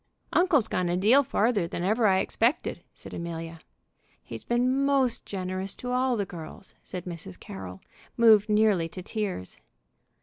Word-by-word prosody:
"Uncle's 320 - +3
gone 180 -4 -1
a 175 - 0
deal 225 +9 +5
farther 220 -7 +1
than 170 - -4
ever 215 +4 +2
I 190 -1 +3
expected," 235 +7 0
said - - -12
Amelia. 165 -1 -6 0.6
"He's 115 - -8
been 255 +3 +1
most 275 -3 +2
generous 185 0 -3
to 250 - -5
all 250 -1 +1
the 200 - -1
girls," 175 +2 -10
said 180 -2 -7
Mrs. 160 - -8
Carroll, 95 -1 -9 0.4
moved 220 -2 +6
nearly 210 -6 +3
to 185 +2 -9
tears. 200 - -4
200 Hz, 155 wpm, -27 LUFS, 175-240 Hz, 0.6 s, moved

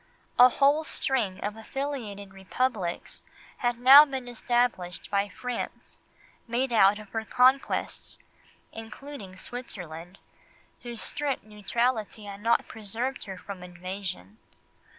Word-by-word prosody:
A 250 +1 +10
whole 285 +4 +3
string 235 -11 -1
of 205 +1 -2
affiliated 220 -5 -5
Republics 195 -1 -2 0.4
had 240 -1 0
now 265 +4 +10
been 265 -4 -5
established 240 -7 -1
by 200 0 +1
France, 250 +4 -6 0.5
made 240 +2 0
out 205 -2 +6
of 210 -1 -11
her 225 +1 -3
conquests—including 250 -2 -2
Switzerland, 180 -6 -8 0.6
whose 235 -2 -6
strict 285 -2 -2
neutrality 215 +1 -1
had 200 0 -8
not 230 +2 +2
preserved 225 +5 -4
her 190 -2 -7
from 190 0 -8
invasion. 180 - -7
225 Hz, 110 wpm, -28 LUFS, 195-250 Hz, 0.6 s, A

